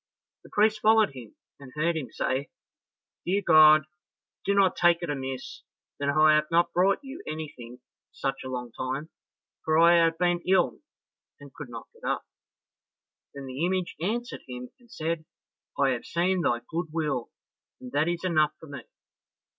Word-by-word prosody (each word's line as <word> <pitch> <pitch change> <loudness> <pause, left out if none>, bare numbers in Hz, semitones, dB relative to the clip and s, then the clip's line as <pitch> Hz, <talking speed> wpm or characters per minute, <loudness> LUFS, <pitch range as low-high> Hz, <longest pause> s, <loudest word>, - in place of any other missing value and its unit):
The - - -15
priest 215 +1 +2
followed 215 -4 +4
him, 125 -5 -12 0.2
and 135 -2 -12
heard 165 +3 +1
him 155 -5 -4
say, 130 +2 -2 0.7
"Dear 195 +3 0
God, 155 -1 +7 0.6
do 200 - +2
not 195 -2 +4
take 175 0 +3
it 165 - -2
amiss 130 -2 -5 0.4
that 140 0 -1
I 155 +2 +5
have 150 0 +2
not 170 0 +2
brought 190 +3 +3
you 275 +6 -8
anything 130 -6 -7
for 125 - -41 0.3
such 135 0 -3
a 130 - -6
long 125 -2 -5
time, 130 +6 -4 0.5
for 155 0 +2
I 170 +1 +6
have 165 0 +1
been 175 0 +1
ill 185 -1 +2 0.6
and - - -13
could - - -9
not - - -9
get 465 +1 -23
up." - - -2 1.1
Then 140 -1 -7
the 130 +4 -4
image 185 0 -1
answered 240 +7 -3
him 125 0 -8
and 240 -1 -23
said, 160 0 -3 0.5
"I 140 -1 +3
have 120 -2 -3
seen 180 +2 +1
thy 120 -6 +1
good 165 +1 -3
will, 150 -7 -2 0.5
and 125 -1 -10
that 145 +4 +1
is 175 0 -2
enough 155 -5 +2
for - - -12
me. 140 -3 -7
160 Hz, 170 wpm, -27 LUFS, 135-175 Hz, 1.1 s, God